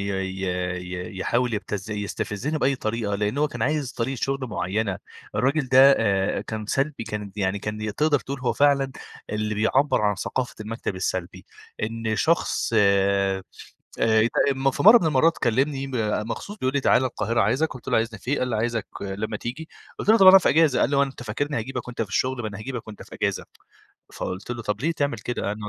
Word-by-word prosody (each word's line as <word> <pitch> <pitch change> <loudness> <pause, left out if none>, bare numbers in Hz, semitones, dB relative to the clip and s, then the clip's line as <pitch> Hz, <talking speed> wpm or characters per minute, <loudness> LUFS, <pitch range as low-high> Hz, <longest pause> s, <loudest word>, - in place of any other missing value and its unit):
ي 95 0 -3 0.5
ي 90 +2 -6
يحاول 120 +4 0
يبتز 105 0 -4
يستفزِّني 105 +7 -3
بأي 135 -1 +1
طريقة، 110 -3 -2
لإن 105 +5 -1
هو 150 0 +2
كان - - -5
عايز 150 -4 0
طريقة 130 +3 -2
شغل 135 -1 -1
معيّنة. 100 -1 -2 0.4
الراجل 135 +1 +1
ده 130 +1 +4 0.2
آآ 100 -3 +1
كان 110 -1 -6
سلبي، 135 +1 -1
كان 105 -2 -5
يعني 100 -1 0
كان 105 0 -4
تقدر 150 -2 +2
تقول 140 -1 -6
هو 125 - 0
فعلًا 140 -2 +2 0.4
اللي 110 0 -2
بيعبَّر 120 +7 +2
عن 105 -1 +2
ثقافة 120 +5 -3
المكتب 110 -2 -4
السلبي. 95 -1 -3 0.4
إن 110 0 -2
شخص 165 -3 +1
آآ 100 -1 +3 0.6
ات 110 +1 +3 0.2
م 135 0 +1
في - - -3
مرّة 220 +4 +9
من 175 - -1
المرّات 160 +2 +3
كلّمني 135 +4 0 0.4
مخصوص 200 - -6
بيقول 130 -3 -1
لي: 140 - +2
"تعال 130 - +3
القاهرة 115 -2 -1
عايزك." 130 +10 +1
قُلت 130 - -10
له: - - +2
"عايزني 115 -1 -1
في 125 - -6
إيه؟" 145 - +1
قال 125 - -1
لي: 115 - -1
"عايزك 115 0 -1
لمّا 100 +2 -4
تيجي." 135 +9 -6 0.3
قُلت - - -5
له: 220 - +7
"طب 195 - +6
أنا 190 +1 +11
في 185 - +1
إجازة." 155 -4 +4
قال - - +2
لي: 145 - +1
"هو 140 - +5
أنت 135 -3 -4
فاكرني 140 +5 -2
هاجيبك 125 +2 -5
وأنت 120 -2 -3
في 105 - -6
الشغل، 130 +5 -1
ما 110 - -2
أنا 100 -2 -8
هاجيبك 120 0 -6
وأنت 105 - -9
في - - -13
إجازة." - - -1 0.7
فقُلت 95 +5 -5
له: 120 -1 -4
"طب 105 -1 -2
ليه 160 +5 +1
تعمل 140 -6 -1
كده؟" 105 -1 -3
أنا 105 0 -7
115 Hz, 200 wpm, -24 LUFS, 105-135 Hz, 0.7 s, أنا